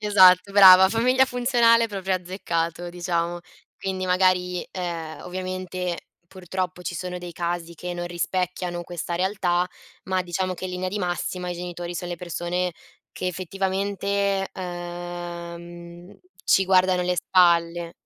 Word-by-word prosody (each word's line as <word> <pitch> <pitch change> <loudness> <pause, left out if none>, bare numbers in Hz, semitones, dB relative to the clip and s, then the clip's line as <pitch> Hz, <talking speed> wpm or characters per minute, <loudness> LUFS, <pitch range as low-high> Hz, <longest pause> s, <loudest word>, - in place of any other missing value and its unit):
Esatto 195 -2 +6
brava. 190 -2 +9
Famiglia 250 +5 +3
funzionale 240 -2 +3
proprio 195 -3 -2
azzeccato 175 -2 -3
diciamo. 175 -1 -2 0.4
Quindi 190 -1 -3
magari, 180 -1 +2
ehm, 170 -4 -5
ovviamente 185 -1 -4 0.2
purtroppo 185 0 -5
ci 175 - -4
sono 180 +1 -4
dei 175 -1 -8
casi 170 0 -3
che 180 +2 -5
non 175 0 -4
rispecchiano 175 0 -2
questa 175 0 -4
realtà, 180 -1 +1 0.4
ma 185 0 0
diciamo 185 +1 -2
che 185 - -8
in 185 - -3
linea 180 0 -3
di 205 +3 -3
massima, 180 0 -2
i - - -3
genitori 175 0 -6
son 175 +1 -4
le 175 - -4
persone 180 +1 -2 0.4
che - - -4
effettivamente, 195 +2 -1
ehm, 175 0 -7 0.3
ci 190 - +4
guardano 185 -1 +3
le 180 0 0
spalle. 170 -1 +3
180 Hz, 135 wpm, -24 LUFS, 175-190 Hz, 0.4 s, brava